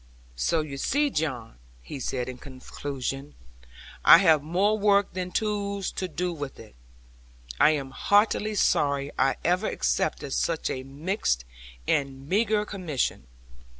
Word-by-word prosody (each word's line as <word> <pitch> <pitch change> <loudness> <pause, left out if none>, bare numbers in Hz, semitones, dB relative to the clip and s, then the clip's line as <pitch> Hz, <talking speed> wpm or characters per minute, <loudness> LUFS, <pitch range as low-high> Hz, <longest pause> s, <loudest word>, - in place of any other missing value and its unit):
'So 155 - +1
you 145 -3 -6
see, 290 - +1
John,' 125 - -3 0.2
he 140 - -7
said 125 -1 -3
in 130 -1 -7
conclusion, 135 +1 -6 0.7
'I - - +10
have 165 -5 +4
more 185 +8 +1
work 200 -1 +3
than 180 0 -3
tools 200 -1 -2
to 185 - -3
do 180 +1 -2
it 160 - -11 0.2
with. 110 - -13 0.9
I - - +7
am 140 -4 -1
heartily 210 +5 +2
sorry 140 -6 +1
I 135 0 +3
ever 180 +5 +2
accepted 140 -3 -1
such 165 -2 0
a 130 - -3
mixed 135 - -2 0.4
and 135 -1 -1
meagre 210 +3 +2
commission. 155 - -3
155 Hz, 135 wpm, -26 LUFS, 135-200 Hz, 0.9 s, I